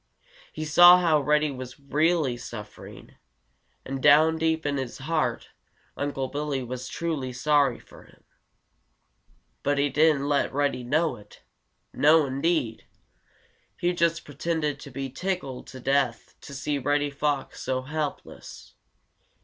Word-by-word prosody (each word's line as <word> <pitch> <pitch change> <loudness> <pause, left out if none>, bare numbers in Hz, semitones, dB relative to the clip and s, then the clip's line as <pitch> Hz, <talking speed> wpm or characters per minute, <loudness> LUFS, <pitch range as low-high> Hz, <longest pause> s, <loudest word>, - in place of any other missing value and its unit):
He 155 - -5
saw 175 +4 +8
how 165 -4 +3
Reddy 150 +1 +2
was 130 0 -9
really 150 -1 +1
suffering, 115 -3 -10 0.7
and 135 0 -5
down 155 +3 +5
deep 160 -1 0
in 140 -1 0
his 130 -3 -5
heart 145 -4 -2 0.5
Unc' 145 0 -3 0.2
Billy 145 -2 -2
was 125 +1 -6
truly 155 -6 -3
sorry 140 +2 +2
for - - -17
him. - - -23 1.4
But 145 0 0
he 140 +1 +2
didn't 150 -1 +3
let 145 -1 +1
Reddy 140 -2 -1
know 155 +6 0
it. 105 - -17 0.5
No, 155 +1 +5
indeed! 140 -3 -1 0.9
He 175 +1 0
just 170 -1 0
pretended 150 -1 -2
to 145 - -10
be 135 +1 -5
tickled 175 -5 -4
to 130 - -10
death 135 -2 0
to 140 - -10
see 145 +1 -2
Reddy 145 +2 0
Fox 140 -1 -2
so 130 0 -2
helpless. 150 +1 -6
145 Hz, 135 wpm, -26 LUFS, 135-155 Hz, 1.4 s, saw